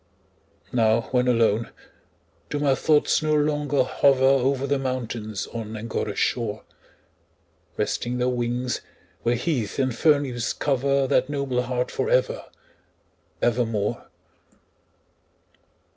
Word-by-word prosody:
Now, 115 -1 +3
when 125 -1 +2
alone, 115 -2 +2 0.8
do 145 - -2
my 145 -2 +2
thoughts 150 +3 +2
no 155 0 +1
longer 150 -1 +1
hover 135 -2 +3
Over 135 0 +3
the 140 0 0
mountains 115 -5 -3
on 110 -1 -5
Angora's 110 -2 -3
shore, 110 -3 -1 1.1
Resting 120 +1 -1
their 125 0 +1
wings, 125 0 -1 0.4
where 120 +1 +1
heath 125 -5 -2
and 130 -3 0
fern 145 +2 +4
leaves 120 -3 -2
cover 140 0 +1
That 130 0 +2
noble 140 -3 -1
heart 125 0 -2
for 455 - -2
ever, - - +1 1.0
ever 120 +1 +3
more? 105 -3 -2
125 Hz, 115 wpm, -24 LUFS, 115-140 Hz, 1.1 s, fern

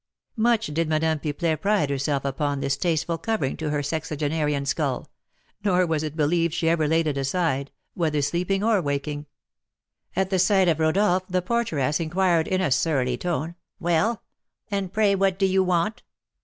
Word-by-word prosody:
Much 225 -1 +2
did 160 -1 -1
Madame 160 0 +1
Pipelet 155 +1 -1
pride 200 -8 +1
herself 140 0 -1
upon 140 +1 -1
this 135 0 0
tasteful 165 +2 -1
covering 220 -12 -1
to 155 0 -3
her 145 -1 -1
sexagenarian 150 -1 -1
skull; 140 -2 -2 0.5
nor 185 -3 +3
was 160 -3 0
it 155 -1 -4
believed 165 +2 +1
she 165 -1 0
ever 165 -2 +2
laid 165 +1 +2
it 145 -3 -1
aside, 140 -1 0 0.2
whether 155 -4 0
sleeping 175 +7 0
or 220 -3 +3
waking. 145 0 -3 0.9
At 190 0 0
the 190 - +2
sight 190 0 +4
of 160 -2 +2
Rodolph 185 +3 +2
the 180 -1 -1
porteress 170 - 0
inquired, 170 0 +1
in 185 0 0
a 180 - 0
surly 130 -4 +1
tone: 165 +2 -2 0.3
"Well, 175 +6 +1 0.5
and 195 -3 -2
pray 210 -1 +3
what 195 -1 +1
do 195 - +2
you 190 0 +3
want?" 180 +4 0
165 Hz, 170 wpm, -24 LUFS, 150-185 Hz, 0.9 s, sight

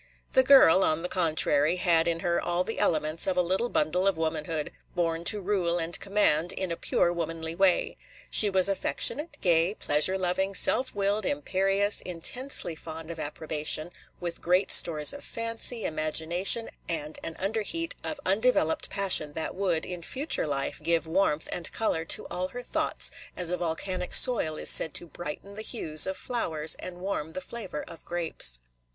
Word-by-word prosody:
The 260 - +5
girl, 260 -9 +5
on 155 +2 -1
the - - -3
contrary, 160 -2 +1
had 170 -2 +1
in 165 0 -2
her 170 0 -1
all 175 +1 -2
the 225 - -6
elements 155 +1 0
of 185 -1 -1
a - - +4
little 190 +7 -1
bundle 180 +3 0
of 195 -4 0
womanhood, 160 -1 -3 0.2
born 165 -1 -2
to 210 - +4
rule 185 -3 -1
and 165 0 -2
command 185 -5 +1
in 190 -2 -5
a - - -2
pure 175 +1 -1
womanly 165 -1 -5
way. 185 +1 0 0.3
She 210 - +6
was 190 -1 +3
affectionate, 295 - +1
gay, 175 +2 +2
pleasure 155 +4 +3
loving, 190 +1 -2
self 255 +6 +3
willed, 200 +1 0
imperious, 200 -7 +1
intensely 180 +3 0
fond 160 +1 -9
of 165 - -9
approbation, 155 +2 -1 0.3
with 175 -1 -5
great 180 +3 +1
stores 150 -3 +6
of 285 - -10
fancy, 230 0 -3
imagination, 165 +8 0 0.2
and 155 -2 -5
an 165 - -6
under 215 +4 -2
heat 330 +9 -3
of 305 - -4
undeveloped 195 -5 +1
passion 190 -7 +2
that 160 - -5
would, 180 -4 -2
in 180 -1 -7
future 265 - -1
life, 140 -2 -3
give 165 +1 0
warmth 160 -2 -1
and 175 - -3
color 165 -7 -1
to - - +1
all 180 +1 -3
her 245 +6 -9
thoughts, - - +1 0.3
as 180 -1 -3
a 180 - -1
volcanic 180 +2 -2
soil 185 -12 +6
is - - +4
said 160 - +4
to - - +1
brighten 175 +4 -9
the 215 - -8
hues 160 -10 +3
of 190 - -4
flowers 160 -11 +1
and 180 -1 -9
warm 170 -5 -5
the - - -4
flavor 215 -6 -7
of 165 - -11
grapes. 165 - -2
175 Hz, 175 wpm, -26 LUFS, 160-195 Hz, 0.3 s, She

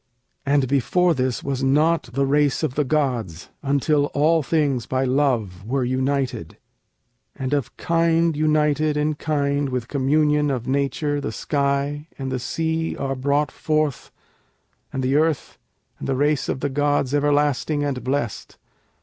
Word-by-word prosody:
And 140 -1 +3
before 170 +7 +2
this 130 -3 -1
was 135 -1 -2
not 150 +1 +2
the 140 +2 +1
race 145 0 +2
of - - 0
the 150 - +1
gods, 125 - -1
until 145 +1 +2
all 160 +3 +3
things 140 -5 0
by 130 0 0
Love 125 -9 0
were 130 +5 -1
united: 130 - -1 0.8
And 135 0 -3
of 140 -5 -2
kind 165 -1 +2
united 150 0 +2
in 150 +1 +1
kind 145 -2 -1
with 125 -2 -3
communion 150 +2 +2
of 125 -4 -2
nature 140 +2 -1
the - - -3
sky 140 +1 -1
and 135 -1 -4
the 130 - -1
sea 160 +5 -2
are 135 -1 -2
Brought 140 +2 0
forth, 155 -4 -1 0.8
and 130 - -3
the 130 +2 +1
earth, 155 -2 0 0.4
and - - -5
the 135 - 0
race 145 0 +1
of 130 - -2
the 145 - 0
gods 145 -1 0
everlasting 145 0 +1
and 140 -3 -2
blest. 130 -5 -3
140 Hz, 150 wpm, -22 LUFS, 130-150 Hz, 0.8 s, And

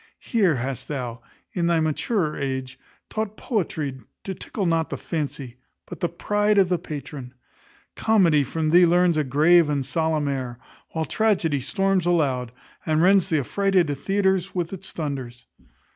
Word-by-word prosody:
Here 195 - +1
hast 130 +1 -4
thou, 125 -5 -4 0.3
in 170 -2 0
thy 170 -1 +3
maturer 155 +2 0
age, 130 -1 -4 0.3
taught 215 -1 -4
poetry 155 - -2 0.2
to 195 - -4
tickle 195 +2 -4
not 165 -2 +1
the - - -4
fancy, 140 -6 -4 0.3
but - - -9
the 175 - 0
pride 205 +4 +1
of 190 -2 +4
the 180 -2 +1
patron. 145 -5 -8 0.6
Comedy 175 -10 +3
from 155 +3 -2
thee 175 +1 +7
learns 175 0 +3
a 155 - +2
grave 155 +5 +4
and 140 -2 -1
solemn 160 -2 0
air; 130 -3 -3 0.3
while 160 -1 -2
tragedy 180 -10 +1
storms 195 +6 0
aloud, 135 -8 +1 0.3
and 155 0 +1
rends 190 -1 +5
th' - - -2
affrighted 175 +1 +1
theatres 190 +4 0
with 175 0 -2
its 190 0 -7
thunders. 135 -6 -5
160 Hz, 155 wpm, -24 LUFS, 140-185 Hz, 0.6 s, thee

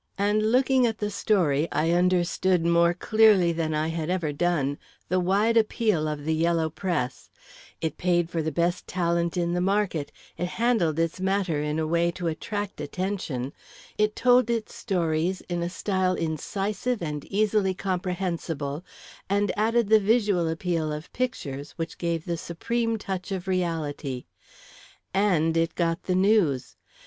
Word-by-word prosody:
And 210 +2 +2
looking 260 0 +4
at 220 -1 -2
the 210 0 -2
story, 170 -8 +2
I 160 +2 +1
understood, 180 0 +2
more 170 0 +4
clearly 210 -3 +4
than 160 -2 -1
I 155 +1 0
had 165 0 -3
ever 175 -5 -1
done, 145 -3 0 0.3
the 185 +1 +2
wide 200 +6 +2
appeal 215 -7 +2
of 150 -1 -4
the 160 - +1
yellow 165 0 +1
press 165 -8 -3 0.5
it 160 -2 -3
paid 175 -2 +2
for 165 -1 -2
the 160 0 -2
best 170 +4 0
talent 170 -1 0
in 175 0 0
the 180 - 0
market; 190 -6 0 0.3
it 175 - 0
handled 225 -10 +2
its 165 +2 0
matter 190 -5 0
in 150 +1 -1
a 160 - 0
way 170 +2 +2
to 175 - -6
attract 200 +5 -3
attention; 175 -9 -3 0.4
it 210 0 +1
told 250 0 +4
its 230 -2 -2
stories 175 -2 -1
in 175 -1 -4
a 170 - -1
style 185 0 0
incisive 195 - -2
and 150 -3 -4
easily 205 -2 +1
comprehensible, 180 -5 -3 0.5
and 205 +1 +2
added 225 +1 +2
the 220 0 +7
visual 205 -5 +2
appeal 165 -1 -1
of 150 +2 -7
pictures, 145 - -3
which 165 -1 -5
gave 170 -2 -1
the 170 -1 -2
supreme 230 +7 -2
touch 190 -2 -5
of 190 -1 -4
reality. 160 -8 -2 0.9
And 175 -5 +2
it 165 0 +1
got 165 -1 0
the 185 - +1
news. 185 - +2
175 Hz, 155 wpm, -26 LUFS, 160-205 Hz, 0.9 s, the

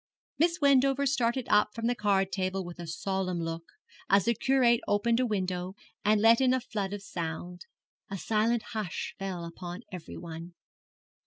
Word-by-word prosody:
Miss 335 +2 +3
Wendover 275 -1 +4
started 255 -2 +1
up 210 0 +3
from 230 0 -3
the 240 - +3
card 195 -4 +1
table 190 -1 -1
with 175 0 -9
a 170 - -6
solemn 185 +1 -2
look, 165 0 -4 0.4
as 195 0 +5
the 235 - +3
curate 245 -1 +3
opened 230 +3 +2
a 255 - +2
window 185 -3 -2 0.3
and 210 +1 +4
let 230 +3 +6
in 260 -1 +4
a - - +1
flood 210 -5 -4
of 205 -1 -5
sound. 175 0 -5 0.4
A 195 - -4
silent 225 +3 +1
hush 215 -6 -3
fell 185 -3 -4
upon 175 +4 -7
everyone. 170 -1 -8
205 Hz, 165 wpm, -29 LUFS, 180-235 Hz, 0.4 s, let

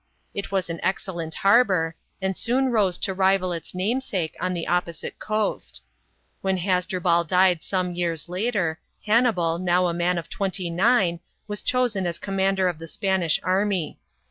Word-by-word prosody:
It 200 -1 -5
was 190 -2 0
an 165 -1 -5
excellent 175 -4 -2
harbour, 195 -6 +3 0.3
and 190 0 0
soon 255 +5 +1
rose 200 -6 +2
to 190 - -1
rival 190 -1 +2
its 165 +1 -7
namesake 190 - -1
on 185 0 -1
the 170 - -3
opposite 175 -2 -2
coast. 215 0 -2 0.6
When 190 -1 0
Has 180 0 +1
drubal 175 -2 +2
died 180 -1 +4
some 185 0 -1
years 170 -2 -1
later, 180 -3 -1 0.3
Hannibal, 210 -7 +2
now 180 0 +2
a 170 - -1
man 175 +1 +1
of 170 - -4
twenty 185 -3 -2
nine, 185 -2 +3 0.3
was 210 -1 -4
chosen 240 -7 +1
as 170 - -3
commander 195 -1 +1
of 175 -3 -2
the 165 - -8
Spanish 185 -2 +1
army. 190 -2 0
185 Hz, 160 wpm, -24 LUFS, 170-200 Hz, 0.6 s, died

